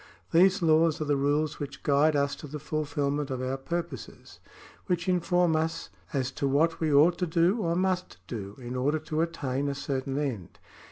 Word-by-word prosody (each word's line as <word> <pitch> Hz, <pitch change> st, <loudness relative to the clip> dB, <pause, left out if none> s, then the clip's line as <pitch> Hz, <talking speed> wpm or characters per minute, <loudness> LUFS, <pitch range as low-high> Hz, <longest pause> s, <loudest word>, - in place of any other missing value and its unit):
These 185 Hz, +3 st, +4 dB
laws 160 Hz, 0 st, +4 dB
are 155 Hz, -, -2 dB
the 145 Hz, -1 st, +2 dB
rules 145 Hz, +2 st, 0 dB
which 145 Hz, -1 st, -7 dB
guide 145 Hz, +2 st, +3 dB
us 140 Hz, 0 st, +1 dB
to -, -, -9 dB
the 150 Hz, +2 st, -6 dB
fulfilment 145 Hz, -1 st, -2 dB
of 130 Hz, -1 st, -3 dB
our 130 Hz, +1 st, -2 dB
purposes; 165 Hz, -1 st, -6 dB, 0.5 s
which 180 Hz, 0 st, -1 dB
inform 175 Hz, -2 st, +2 dB
us 160 Hz, +1 st, -2 dB, 0.2 s
as 135 Hz, -2 st, -1 dB
to 140 Hz, -, -2 dB
what 160 Hz, +4 st, +2 dB
we 160 Hz, -2 st, 0 dB
ought 160 Hz, +5 st, +5 dB
to 180 Hz, -, 0 dB
do, 170 Hz, +7 st, +2 dB
or 170 Hz, -2 st, 0 dB
must 185 Hz, -, -1 dB
do, 100 Hz, -3 st, -6 dB
in 125 Hz, 0 st, -7 dB
order 140 Hz, +5 st, +1 dB
to 155 Hz, 0 st, -2 dB
attain 140 Hz, -4 st, -2 dB
a 140 Hz, -, -3 dB
certain 135 Hz, -1 st, -3 dB
end. 125 Hz, -, -3 dB
150 Hz, 185 wpm, -28 LUFS, 140-165 Hz, 0.5 s, ought